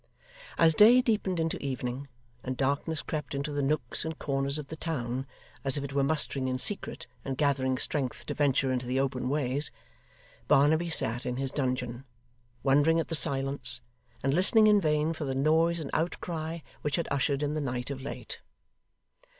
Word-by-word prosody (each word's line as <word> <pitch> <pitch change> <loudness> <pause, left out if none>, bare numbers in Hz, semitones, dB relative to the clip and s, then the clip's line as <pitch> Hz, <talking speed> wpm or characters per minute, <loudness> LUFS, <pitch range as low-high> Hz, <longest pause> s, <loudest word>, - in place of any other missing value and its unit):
As 165 -1 +5
day 225 +9 +7
deepened 210 -7 0
into 165 0 -1
evening, 130 0 -4 0.4
and 130 0 -4
darkness 140 +3 -1
crept 150 -2 -4
into 140 +2 -3
the 145 0 -1
nooks 150 +3 -1
and 160 -1 -4
corners 140 0 0
of 150 -2 -7
the 160 - -5
town 130 -5 -3 0.4
as 135 0 +2
if 140 - -3
it 140 -1 -6
were 140 0 +2
mustering 140 -2 0
in 130 0 -1
secret 195 +9 +2 0.2
and 135 -1 -4
gathering 135 -3 +1
strength 135 -2 -2
to - - -3
venture 135 -2 +2
into 125 -1 -2
the 130 +2 0
open 130 -2 -1
ways, 140 0 0 0.8
Barnaby 160 +5 +4
sat 120 -6 0
in 125 0 -3
his 135 -1 -2
dungeon, 125 -2 -2 0.6
wondering 145 +4 +4
at 165 - -3
the - - -3
silence, 135 -4 +1 0.4
and 135 +1 +1
listening 195 +6 +5
in 210 -1 +5
vain 155 0 +1
for 155 -2 -5
the 135 -1 -2
noise 160 +4 +2
and 150 - -6
outcry 165 0 -3 0.2
which 145 -1 0
had 170 - -2
ushered 140 +1 0
in 145 0 -1
the 155 - -2
night 125 -1 -3
of 135 -1 -5
late. 140 - -6
140 Hz, 180 wpm, -29 LUFS, 130-160 Hz, 0.8 s, day